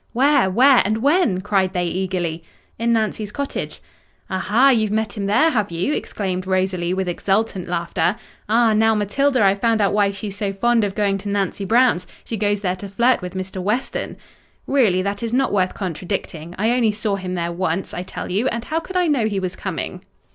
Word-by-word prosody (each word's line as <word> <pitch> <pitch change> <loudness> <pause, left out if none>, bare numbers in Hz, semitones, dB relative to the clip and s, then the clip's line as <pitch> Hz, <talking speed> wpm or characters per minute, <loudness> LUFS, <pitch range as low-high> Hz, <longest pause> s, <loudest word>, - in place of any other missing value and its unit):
"Where? 270 -3 +3
where? 255 +7 +6
and 215 +3 -1
when?" 285 - +3
cried 190 -2 +1
they 180 -2 0
eagerly. 175 -2 -2 0.4
"In 235 +1 +1
Nancy's 215 -2 -1
cottage." 280 +3 -4 0.5
"Ah 190 - -1
ha! 240 +9 +4
you've 220 -5 +3
met 220 0 -1
him 200 -2 -3
there, 310 +11 +4
have 215 -7 0
you?" 170 - -1
exclaimed 185 -7 -3
Rosalie, 185 -2 0
with 190 0 -1
exultant 195 +1 -1
laughter. 175 +2 0 0.3
"Ah! 225 0 +4
now, 220 +1 +3
Matilda, 250 +5 +1
I've 195 0 +3
found 230 -1 +2
out 200 -1 +2
why 205 -1 +3
she's 200 0 -6
so 200 -1 -2
fond 235 +3 +2
of 200 -1 -2
going 200 -2 +1
to 200 +1 -6
Nancy 200 0 -1
Brown's! 230 -4 +3 0.2
She 230 - -4
goes 205 -1 0
there 185 -2 -1
to 200 +2 -8
flirt 235 +5 +2
with 180 +1 -7
Mr. 185 0 -4
Weston." 215 +8 -2 0.5
"Really, 210 -10 +2
that 200 +1 -3
is 230 0 -3
not 265 -2 +1
worth 185 -2 +1
contradicting—I 180 +1 -3
only 235 -3 +2
saw 210 -1 -1
him 185 -1 -4
there 170 -1 -2
once, 180 +1 -2
I - - -3
tell 180 - -6
you—and 235 +4 -1
how 320 - -1
could 370 +2 -5
I 360 - +3
know 275 -9 +2
he 205 -2 -1
was 185 -1 -3
coming?" - - -5
205 Hz, 200 wpm, -21 LUFS, 185-230 Hz, 0.5 s, where